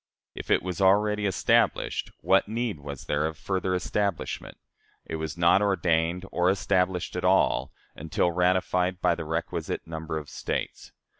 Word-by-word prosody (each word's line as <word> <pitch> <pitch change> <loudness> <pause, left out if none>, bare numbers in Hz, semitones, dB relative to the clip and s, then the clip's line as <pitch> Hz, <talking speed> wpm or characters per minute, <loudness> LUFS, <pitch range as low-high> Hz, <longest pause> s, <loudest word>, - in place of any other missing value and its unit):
If - - -8
it - - +3
was 90 +1 -4
already 105 +2 +3
established, 95 - +1
what 95 +1 +3
need 110 -5 -2
was 70 0 -8
there 75 +1 0
of 80 -1 -6
further 95 +1 -1
establishment? 100 +1 -2 0.5
It 80 - -4
was 80 0 -5
not 85 +3 +4
ordained 90 -3 +1
or 90 +1 +2
established 90 -1 0
at - - -3
all, - - +2 0.2
until 80 +3 0
ratified 90 +1 +1
by 85 - +3
the 80 - -5
requisite 80 +2 -3
number 80 -1 -5
of 75 -1 -6
States. - - -4
90 Hz, 150 wpm, -27 LUFS, 80-95 Hz, 0.5 s, not